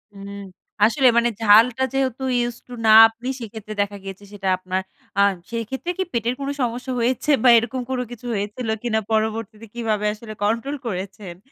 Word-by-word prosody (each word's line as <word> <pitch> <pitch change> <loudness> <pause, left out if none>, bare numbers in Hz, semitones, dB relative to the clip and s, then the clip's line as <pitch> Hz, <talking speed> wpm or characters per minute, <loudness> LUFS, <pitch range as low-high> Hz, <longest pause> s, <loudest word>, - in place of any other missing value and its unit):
উম 200 0 -9 0.6
আসলে 260 +3 +3
মানে 235 0 +4
ঝালটা 225 +4 +5
যেহেতু 265 -1 -1
ইউজড 240 0 -2
টু 245 - -10
না 220 - +6 0.2
আপনি, 230 +3 -10
সেক্ষেত্রে 215 -1 -8
দেখা 200 0 -3
গিয়েছে 195 +1 -8
সেটা 195 -2 -5
আপনার 185 +1 -3 0.4
আ - - +6 0.3
সেক্ষেত্রে 235 +8 -4
কি 380 - +1
পেটের 235 +1 0
কোনো 280 0 -3
সমস্যা 245 +2 -2
হয়েছে 250 +5 0
বা 250 - +7
এরকম 240 +3 -1
কোনো 250 -1 -1
কিছু 245 0 -10
হয়েছিল 210 +4 -4 0.2
কিনা? 220 -2 +1
পরবর্তীতে 220 0 -2
কিভাবে 220 -3 -1
আসলে 215 0 -9
কন্ট্রোল 230 +7 0
করেছেন? 190 -2 -6
225 Hz, 165 wpm, -22 LUFS, 210-245 Hz, 0.6 s, বা